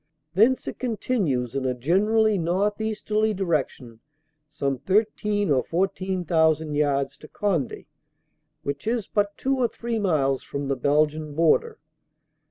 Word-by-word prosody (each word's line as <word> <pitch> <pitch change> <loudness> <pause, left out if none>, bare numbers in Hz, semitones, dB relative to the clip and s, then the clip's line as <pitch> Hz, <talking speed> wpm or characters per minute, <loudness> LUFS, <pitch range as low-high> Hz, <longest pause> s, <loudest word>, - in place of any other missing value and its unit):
Thence 225 +8 +3
it - - -5
con 240 -4 -2
tinues 140 - -1
in 135 -1 -2
a 130 -1 0
generally 210 - +2
northeasterly 210 +4 0
direction 140 - -2 0.5
some 140 -3 -2
thirteen 205 - +1
or 130 -2 +3
fourteen 185 +1 -1
thousand 160 -2 +2
yards 140 -2 0
to 155 - -13
Conde, 175 - -2 0.8
which 140 +7 -4
is 230 -3 0
but 205 -1 -1
two 270 0 0
or 245 - +3
three 230 -1 -4
miles 145 -9 +1
from 140 -1 -5
the 135 - +1
Belgian 150 +3 +1
border. 435 - +2
175 Hz, 135 wpm, -25 LUFS, 140-210 Hz, 0.8 s, Thence